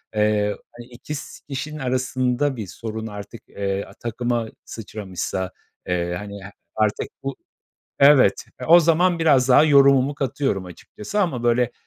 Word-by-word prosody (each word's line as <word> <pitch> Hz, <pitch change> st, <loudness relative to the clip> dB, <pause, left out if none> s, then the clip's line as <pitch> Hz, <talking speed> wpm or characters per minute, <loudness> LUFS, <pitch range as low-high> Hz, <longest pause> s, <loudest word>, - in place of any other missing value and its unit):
eee, 105 Hz, -1 st, +1 dB, 0.2 s
hani, 120 Hz, -, -10 dB
2 125 Hz, +5 st, -7 dB
s 140 Hz, -, -9 dB
kişinin 150 Hz, +3 st, -5 dB
arasında 130 Hz, +1 st, 0 dB
bir 110 Hz, -5 st, -6 dB
sorun 110 Hz, +3 st, -6 dB
artık, 105 Hz, +1 st, -9 dB
eee, 100 Hz, 0 st, -2 dB
a -, -, -14 dB
takıma 120 Hz, +1 st, -2 dB, 0.2 s
sıçramışsa, 95 Hz, -3 st, -5 dB, 0.4 s
eee, 85 Hz, -1 st, -1 dB
hani, 100 Hz, 0 st, -8 dB
he 100 Hz, -, -10 dB, 0.2 s
artık 110 Hz, -1 st, 0 dB, 0.2 s
bu 135 Hz, 0 st, -3 dB, 0.6 s
Evet. 140 Hz, -1 st, +5 dB
E, -, -, -5 dB
o 170 Hz, +2 st, +8 dB
zaman 170 Hz, +1 st, +3 dB
biraz 135 Hz, -5 st, +4 dB
daha 125 Hz, -, +7 dB
yorumumu 140 Hz, -2 st, +5 dB
katıyorum 135 Hz, -8 st, -1 dB
açıkçası 105 Hz, -, -6 dB
ama, 130 Hz, -10 st, -1 dB
böyle, 120 Hz, 0 st, +2 dB
120 Hz, 145 wpm, -22 LUFS, 105-140 Hz, 0.6 s, o